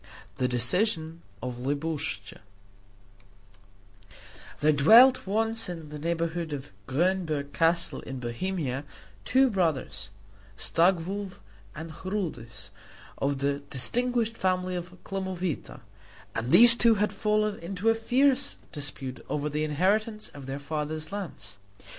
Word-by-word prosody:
THE 125 - +1
DECISION 160 - 0 0.2
OF 125 -1 -5
LIBUSCHA 145 +4 -4 2.2
There 150 +1 +4
dwelt 225 - +6
once 225 +1 0
in 165 -4 -7
the 150 0 -8
neighborhood 165 0 -2
of 135 -8 -7 0.2
Grünberg 155 -1 -1
Castle 170 +1 +1
in 135 -1 -7
Bohemia 135 +2 -3 0.4
two 260 0 +3
brothers 165 - -1 0.5
Staglow 185 - 0 0.4
and 160 +1 -7
Chrudis, 165 - -5 0.5
of 140 0 0
the 140 +1 -1
distinguished 230 - 0
family 185 -1 0
of 180 0 -6
Klemowita 185 -4 -4 0.5
and 115 +3 -3
these 235 +1 +12
two 235 -1 +4
had 210 +1 0
fallen 210 -1 0
into 185 +4 -5
a - - +5
fierce 265 +5 +2 0.2
dispute 140 -4 -6
over 150 0 -2
the 150 +1 -1
inheritance 205 +8 0
of 140 -2 -11
their 135 +1 -4
father's 155 +2 -5
lands. 130 - -7
170 Hz, 115 wpm, -27 LUFS, 145-205 Hz, 2.2 s, these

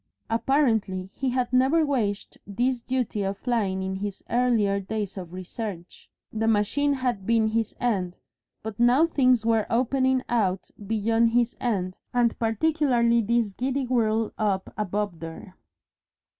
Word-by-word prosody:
Apparently 225 -7 +1
he 265 -1 -2
had 250 0 -1
never 270 +6 +4
weighed 215 -8 -1 0.2
this 245 +5 0
duty 245 -4 -2
of 195 0 -2
flying 200 -6 -1
in 190 0 -3
his 200 0 -5
earlier 230 -5 +2
days 200 0 -4
of 180 -4 -7
research; 185 0 -7 0.2
the 225 0 -1
machine 225 +7 +2
had 245 -7 -2
been 225 -1 +3
his 225 -1 -1
end, 190 -7 -1 0.5
but 220 0 -6
now 245 +6 +5
things 255 -8 +2
were 225 -2 +2
opening 260 +2 +1
out 195 -6 0 0.2
beyond 225 +2 +2
his 240 0 +2
end, 185 -6 -2 0.2
and 240 -2 +2
particularly 235 -1 +2
this 225 -1 0
giddy 265 +4 -1
whirl 225 -3 +1
up 200 -3 -1
above 205 -3 -2
there. 165 +3 -9
225 Hz, 140 wpm, -25 LUFS, 200-250 Hz, 0.5 s, now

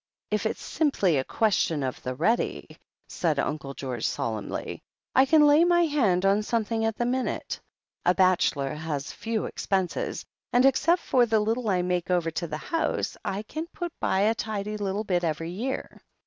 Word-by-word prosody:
"If - - +1
it's - - -5
simply 205 - +1
a 130 - +1
question 170 -6 +1
of 130 -1 -3
the 130 0 -4
ready," 220 - -1 0.3
said 160 -4 -1
Uncle 140 -1 -2
George 125 -4 -3
solemnly, 110 -3 -4 0.3
"I 265 - +7
can 300 +1 +6
lay 295 +3 +6
my 345 0 +4
hand 215 - +2
on 200 +2 +4
something 225 0 -1
at 225 -1 -1
the 240 - 0
minute. 255 +1 -2 0.4
A 180 - +3
bachelor 180 -7 +2
has 150 -2 -4
few 225 -1 -2
expenses, 190 -3 -2 0.3
and 245 +2 +4
except 330 +6 +3
for 245 -2 +3
the 220 -1 +3
little 225 +2 0
I 180 -2 +2
make 180 -1 -1
over 175 -2 +1
to 170 - -3
the 155 -1 -4
house, 325 - -1
I 200 +2 -3
can 315 +9 -5
put 345 -2 -4
by 190 - +1
a 215 +2 +4
tidy 215 -1 -3
little 205 0 -2
bit 180 -4 0
every 165 +1 -2
year. 250 +9 -4
200 Hz, 175 wpm, -27 LUFS, 165-240 Hz, 0.4 s, I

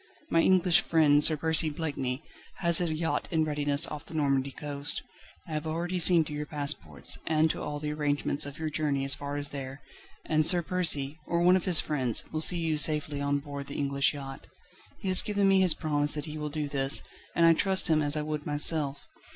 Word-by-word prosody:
My 165 - +3
English 185 -1 +3
friend 150 -3 +3
Sir 155 0 +4
Percy 160 +1 +1
Blakeney, 145 -3 -4 0.3
has 170 -1 +3
a 170 -2 -1
yacht 155 -2 -2
in 160 -2 0
readiness 145 0 +3
off 150 -2 -8
the 160 - -10
Normandy 140 -3 0
coast. 145 +2 -1 0.4
I - - -10
have 155 +1 -4
already 175 +3 -3
seen 170 -1 +5
to 150 - -9
your 150 0 -5
passports 140 - -3
and 160 0 +2
to - - -7
all 145 0 -5
the 150 0 -4
arrangements 145 -1 -1
of 145 - -9
your 160 -1 -4
journey 145 -3 -1
as 135 - +4
far 145 0 -6
as 145 0 -4
there, 135 0 -8 0.4
and 155 0 +1
Sir 175 +2 +3
Percy, 160 -5 0
or 170 0 0
one 180 +1 +5
of 185 - -1
his 180 -4 +3
friends, 130 -7 -2
will 155 - -2
see 175 - +3
you 160 -2 -1
safely 150 -1 +1
on 140 0 -1
board 140 -1 -8
the 140 - -7
English 140 -1 0
yacht. 135 -1 -9 0.5
He - - -8
has 185 -1 +8
given 205 -1 0
me 195 -1 +4
his 180 -4 +3
promise 145 -1 +2
that 150 -1 -5
he 155 -1 -8
will 150 0 -4
do 150 0 -4
this, 135 0 0 0.3
and 170 - +3
I 165 - +6
trust 190 +3 +1
him 155 -2 +2
as 145 +1 -1
I 150 - -2
would 150 -1 -5
myself. 145 -1 +2
150 Hz, 215 wpm, -28 LUFS, 145-165 Hz, 0.5 s, has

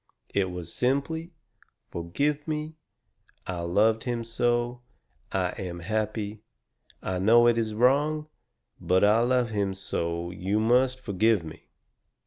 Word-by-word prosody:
It 95 -2 +1
was 90 -2 -5
simply: 140 +7 -1 0.6
'FORGIVE 140 - -1
ME. 155 0 -3 0.7
I 90 -2 -4
LOVED 105 +7 +2
HIM 120 -2 -2
SO. 120 +1 0 0.5
I 95 -2 0
AM 85 -2 -5
HAPPY. 110 +2 -2 0.6
I 95 -1 -2
KNOW 115 +5 +6
IT 115 - +2
IS 110 -2 -2
WRONG, 145 +6 +2 0.5
BUT 95 +1 +2
I 105 +2 +5
LOVE 120 -1 +2
HIM 100 -2 -1
SO 85 -2 -2
YOU 95 +4 -1
MUST 125 +3 +3
FORGIVE 110 -3 +2
ME.'" 80 -1 -11
110 Hz, 125 wpm, -27 LUFS, 95-125 Hz, 0.7 s, KNOW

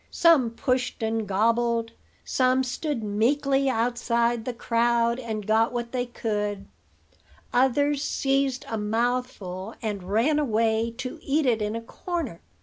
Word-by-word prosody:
Some 320 -8 +4
pushed 250 0 -1
and 220 -1 -1
gobbled; 230 +3 +1 0.3
some 255 0 +2
stood 255 -1 -3
meekly 270 +6 +1
outside 235 -1 0
the 250 - -1
crowd, 235 0 +1
and 220 -4 -4
got 220 +2 +3
what 240 -1 -4
they 250 -1 -1
could; 210 -4 -3 0.9
others 280 +3 +2
seized 270 -2 0
a 225 - -3
mouthful, 220 -3 -2
and 210 -4 -3
ran 265 +9 +3
away 225 -3 +1
to 255 -1 -5
eat 290 +2 +1
it 230 -4 +2
in 210 +1 -1
a 230 - -3
corner. 315 - -5
235 Hz, 135 wpm, -26 LUFS, 220-260 Hz, 0.9 s, Some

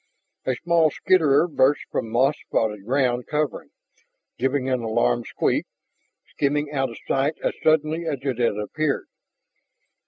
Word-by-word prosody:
A 130 - +1
small 165 +3 +3
skitterer 160 -2 +3
burst 145 -3 +2
from 115 - -2
moss 130 +5 +3
spotted 105 -3 -1
ground 125 -2 +1
covering, 150 -2 -2 0.7
giving 130 +1 0
an 130 -1 +1
alarmed 85 - 0
squeak, - - 0 0.6
skimming 145 +1 -1
out 135 -3 0
of 115 - -10
sight 140 +4 +1
as - - 0
suddenly 155 +1 +2
as 150 -3 -1
it 130 -4 -2
had 115 -4 +1
appeared. 140 +8 -2
135 Hz, 135 wpm, -23 LUFS, 120-155 Hz, 0.7 s, small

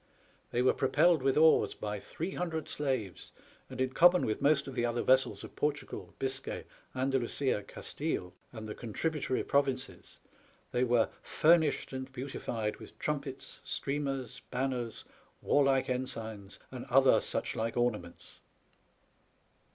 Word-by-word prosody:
They 120 - +1
were 130 - +5
propelled 155 +4 +3
with 135 +1 +2
oars 160 +1 +5
by 105 -1 -4 0.2
800 165 -2 -2
slaves, 130 -10 -3 0.4
and, - - -8
in 130 0 +1
common 175 +5 +6
with 110 - -2
most 140 -1 +3
of 135 - -6
the 120 - -1
other 120 0 0
vessels 130 0 +3
of - - -10
Portugal, 145 -1 -3
Biscay, 135 0 -3 0.3
Andalusia, 130 -2 0
Gastille, 100 - -4 0.2
and 110 -2 -7
the 105 - -4
contributory 130 +5 -2
pro 140 - +4
vinces, 135 -1 -5 0.5
they 125 - +1
were 120 -2 +3
'* - - -29 0.2
furnished 160 -4 +4
and 130 0 -5
beautified 120 -4 -3
with - - -13
trumpets, 140 -3 -4
streamers, 135 -3 -3
banners, 125 -2 -2 0.3
warlike 135 -2 +3
ensigns, 115 -6 -4
and - - -6
other - - +5
such - - -2
like 115 +1 -2
ornaments.' 105 -8 -2
130 Hz, 135 wpm, -32 LUFS, 120-140 Hz, 0.5 s, common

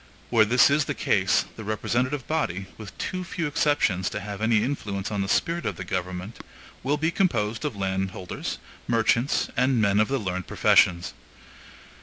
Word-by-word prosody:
Where 115 -3 +5
this 125 +5 +5
is 150 0 +3
the - - -3
case, - - +2
the 110 - -7
representative 120 +5 -1
body, 100 - -1
with 105 -4 -11
too 185 0 -3
few 175 -2 -3
exceptions 145 -11 +1
to - - -4
have 100 +1 -7
any 110 -1 +3
influence 105 -7 -3
on 105 -1 -1
the 95 - -2
spirit 170 +9 +1
of - - -2
the - - -6
government, 90 +2 -4 0.4
will 140 +3 0
be 160 +3 0
composed 115 - 0
of 145 -7 -2
landholders, 95 -1 -3 0.3
merchants, 115 +2 +2
and 130 -1 +2
men 100 -1 +3
of 110 - +3
the 135 - 0
learned 95 -5 -3
professions. 85 -3 +3
110 Hz, 170 wpm, -25 LUFS, 95-135 Hz, 0.4 s, Where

